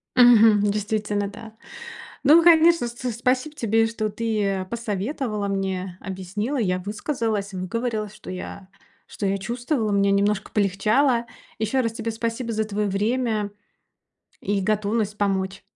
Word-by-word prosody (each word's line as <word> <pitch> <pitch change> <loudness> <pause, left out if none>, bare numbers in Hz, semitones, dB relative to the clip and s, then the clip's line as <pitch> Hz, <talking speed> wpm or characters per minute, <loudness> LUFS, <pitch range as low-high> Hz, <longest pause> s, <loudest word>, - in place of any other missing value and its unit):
Мгм, 225 -4 +7
действительно, 205 0 -1
да. 220 +2 -10 0.7
Ну, 315 +4 +7
конечно, 335 -4 +6
с 235 - -7
с 245 +1 -4
спасибо 255 +5 0
тебе, 225 -3 +2
что 220 -1 -2
ты, 220 0 -2
э, 195 -1 -1
посоветовала 215 +1 -3
мне, 190 -2 -3
объяснила. 195 +7 -4
Я 185 -6 0
высказалась, 210 0 -3
выговорилась, 215 +3 -3
что - - -11
я 185 +1 -7 0.4
что 205 - -5
я 195 0 +1
чувствовала. 240 +3 -2
Мне 200 0 +3
немножко 200 0 +1
полегчало. 220 +5 +2 0.3
Ещё 220 +5 +1
раз 230 -2 -2
тебе 230 0 -3
спасибо 230 +1 -3
за 220 0 0
твоё 210 0 -1
время 215 +1 0 0.9
и 200 0 0
готовность 210 +1 0
помочь. 195 -1 -1
215 Hz, 135 wpm, -24 LUFS, 200-235 Hz, 0.9 s, Мгм